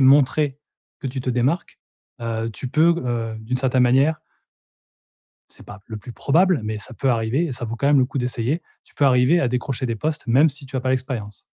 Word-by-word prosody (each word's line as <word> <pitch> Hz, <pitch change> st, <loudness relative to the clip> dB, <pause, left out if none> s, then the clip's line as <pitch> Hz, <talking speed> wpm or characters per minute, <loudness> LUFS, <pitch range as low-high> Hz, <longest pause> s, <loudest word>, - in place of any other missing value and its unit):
montrer 140 Hz, +1 st, +4 dB, 0.4 s
que -, -, -4 dB
tu 130 Hz, +1 st, -4 dB
te 130 Hz, -, -2 dB
démarques, 125 Hz, +8 st, -1 dB, 0.4 s
heu, 115 Hz, 0 st, -2 dB
tu 105 Hz, +6 st, -6 dB
peux 160 Hz, +6 st, +4 dB
g -, -, -4 dB
heu, 115 Hz, -2 st, -2 dB
d'une 115 Hz, +4 st, -2 dB
certaine 130 Hz, 0 st, +2 dB
manière 135 Hz, +6 st, +3 dB, 1.3 s
c'est -, -, -15 dB
pas 105 Hz, 0 st, -11 dB
le 110 Hz, -, -6 dB
plus 105 Hz, +4 st, -10 dB
probable, 170 Hz, +4 st, +2 dB
mais 110 Hz, 0 st, -3 dB
ça 115 Hz, -, -10 dB
peut 135 Hz, +3 st, -1 dB
arriver 120 Hz, +7 st, +1 dB
et 150 Hz, -, -4 dB
ça 120 Hz, -, -5 dB
vaut 115 Hz, +1 st, -4 dB
quand 140 Hz, -, 0 dB
même 145 Hz, 0 st, +5 dB
le 130 Hz, -, +4 dB
coup 135 Hz, -, -4 dB
d'essayer. 125 Hz, +5 st, -1 dB, 0.2 s
Tu -, -, -24 dB
peux 145 Hz, -, +2 dB
arriver 130 Hz, +5 st, +4 dB
à 135 Hz, -, +1 dB
décrocher 125 Hz, +1 st, -2 dB
des 115 Hz, -, -2 dB
postes 150 Hz, +6 st, -3 dB
même 135 Hz, +7 st, +5 dB
si 140 Hz, -1 st, -6 dB
tu 135 Hz, -, -7 dB
as -, -, 0 dB
pas 130 Hz, +1 st, -2 dB
l'expérience. 125 Hz, -7 st, -4 dB
130 Hz, 220 wpm, -22 LUFS, 115-140 Hz, 1.3 s, même